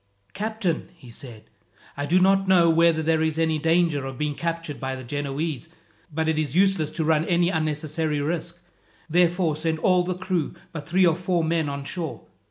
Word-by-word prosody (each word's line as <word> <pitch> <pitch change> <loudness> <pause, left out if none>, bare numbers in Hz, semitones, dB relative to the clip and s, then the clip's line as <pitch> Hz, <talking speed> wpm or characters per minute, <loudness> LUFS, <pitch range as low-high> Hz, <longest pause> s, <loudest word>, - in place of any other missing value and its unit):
"Captain," 210 -6 -2
he 125 -8 -14
said, 115 -2 -10 0.5
"I 145 0 -3
do 180 +5 +4
not 195 +1 +3
know 175 -3 +5
whether 165 -1 +3
there 160 0 +2
is 160 0 0
any 160 -1 +1
danger 165 -2 +2
of 135 -1 -7
being 150 +1 -1
captured 165 -1 -4
by 130 0 -3
the 130 - -8
Genoese. 145 +3 -3 0.4
But 160 +1 -1
it 160 -1 +1
is 150 -2 -2
useless 190 -5 +3
to 160 - -3
run 155 0 +2
any 175 +1 +2
unnecessary 155 -1 -1
risk. 170 +3 -3 0.5
Therefore 175 -1 +2
send 160 +1 -1
all 180 +2 +3
the 180 0 -2
crew 180 -4 -2 0.2
but 150 -4 -7
three 185 +2 +4
or 165 -2 +4
four 180 -1 0
men 160 -2 0
on 140 0 -5
shore. 160 +3 -5
160 Hz, 185 wpm, -24 LUFS, 150-175 Hz, 0.5 s, know